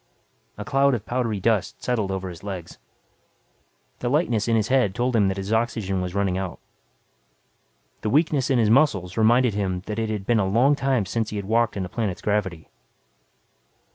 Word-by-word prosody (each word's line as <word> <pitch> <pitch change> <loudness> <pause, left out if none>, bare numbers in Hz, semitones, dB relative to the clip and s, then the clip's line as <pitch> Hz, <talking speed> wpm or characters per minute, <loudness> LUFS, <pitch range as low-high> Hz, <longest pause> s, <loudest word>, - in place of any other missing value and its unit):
A 105 - -6
cloud 135 +1 +3
of 110 -2 -6
powdery 120 -4 -1
dust 105 -2 0
settled 110 -6 -1
over 95 -1 -3
his 85 -2 -10
legs. 95 -5 -7 1.2
The 120 - -2
lightness 120 -7 +1
in 115 - +2
his 110 -1 0
head 125 -8 +2
told 125 +1 0
him 105 -3 +4
that 95 0 -1
his 100 +3 -3
oxygen 110 -5 0
was 90 +1 -4
running 95 -2 0
out. 95 -2 -5 1.4
The 110 - -1
weakness 150 0 +2
in 135 - +3
his 110 -2 +3
muscles 105 - +2
reminded 120 +1 +3
him 95 -3 -2
that 105 +1 -4
it 110 -1 -1
had 105 -3 -3
been 120 0 +2
a 95 - +1
long 125 +8 +4
time 135 -6 0
since 110 +3 -2
he - - -6
had 100 -1 -4
walked 115 0 +1
in 95 - -2
a - - -5
planet's 100 -2 -3
gravity. 95 -6 -1
110 Hz, 190 wpm, -24 LUFS, 95-120 Hz, 1.4 s, him